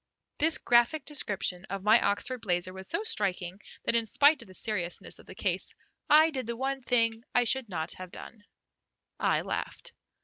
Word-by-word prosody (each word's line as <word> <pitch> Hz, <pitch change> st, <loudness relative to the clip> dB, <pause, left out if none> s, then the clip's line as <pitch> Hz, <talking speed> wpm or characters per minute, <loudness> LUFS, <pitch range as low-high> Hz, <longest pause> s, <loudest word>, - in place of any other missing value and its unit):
This 320 Hz, +1 st, +3 dB
graphic 240 Hz, +5 st, +3 dB
description 195 Hz, -10 st, -2 dB
of 195 Hz, 0 st, -5 dB
my 215 Hz, +3 st, +6 dB
Oxford 230 Hz, +5 st, 0 dB
blazer 180 Hz, -2 st, -1 dB
was 190 Hz, 0 st, -7 dB
so 335 Hz, +6 st, -1 dB
striking 195 Hz, -, -1 dB, 0.2 s
that -, -, +1 dB
in 230 Hz, 0 st, +3 dB
spite 285 Hz, +6 st, +4 dB
of -, -, -13 dB
the 185 Hz, -, -8 dB
seriousness 180 Hz, -5 st, -3 dB
of -, -, -17 dB
the -, -, -11 dB
case -, -, -2 dB, 0.3 s
I 310 Hz, +2 st, +7 dB
did 260 Hz, -6 st, -4 dB
the 235 Hz, 0 st, -4 dB
one 270 Hz, +1 st, -2 dB
thing 230 Hz, -2 st, +1 dB
I 245 Hz, -, +5 dB
should 245 Hz, -1 st, 0 dB
not 160 Hz, -3 st, -3 dB
have 185 Hz, -1 st, -7 dB
done, 210 Hz, +4 st, -11 dB, 0.8 s
I -, -, +2 dB
laughed. -, -, -5 dB
230 Hz, 180 wpm, -29 LUFS, 190-265 Hz, 0.8 s, I